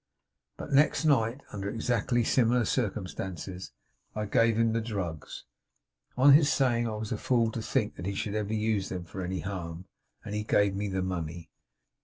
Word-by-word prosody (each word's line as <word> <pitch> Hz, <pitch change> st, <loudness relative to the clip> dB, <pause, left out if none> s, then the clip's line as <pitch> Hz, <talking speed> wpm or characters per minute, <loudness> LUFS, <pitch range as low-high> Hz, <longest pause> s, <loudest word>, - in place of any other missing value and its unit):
But, -, -, -7 dB
next 150 Hz, +3 st, +4 dB
night, 130 Hz, -3 st, +2 dB
under 100 Hz, -1 st, -3 dB
exactly 120 Hz, +1 st, 0 dB
similar 120 Hz, 0 st, +3 dB
circumstances, 95 Hz, -, -3 dB, 0.4 s
I 105 Hz, 0 st, -2 dB
gave 115 Hz, +2 st, +3 dB
him 115 Hz, -1 st, +2 dB
the 115 Hz, -, 0 dB
drugs, 95 Hz, -8 st, -5 dB, 0.7 s
on 135 Hz, +2 st, +7 dB
his 145 Hz, 0 st, +6 dB
saying 120 Hz, -5 st, +2 dB
I 110 Hz, -, -3 dB
was 105 Hz, 0 st, -5 dB
a 110 Hz, -, -2 dB
fool 115 Hz, -3 st, +2 dB
to 115 Hz, -, -4 dB
think -, -, -1 dB
that 90 Hz, -, -5 dB
he 100 Hz, -, -2 dB
should 100 Hz, +1 st, -3 dB
ever 105 Hz, -1 st, -2 dB
use 110 Hz, -2 st, 0 dB
them 90 Hz, -2 st, -5 dB
for 95 Hz, +2 st, -7 dB
any 90 Hz, +1 st, -3 dB
harm; 90 Hz, -3 st, -5 dB, 0.4 s
and 105 Hz, -, -5 dB
he 105 Hz, 0 st, -1 dB
gave 100 Hz, -2 st, +2 dB
me 100 Hz, +1 st, -2 dB
the 95 Hz, -1 st, -1 dB
money. 85 Hz, -2 st, -4 dB
105 Hz, 180 wpm, -29 LUFS, 95-115 Hz, 0.7 s, on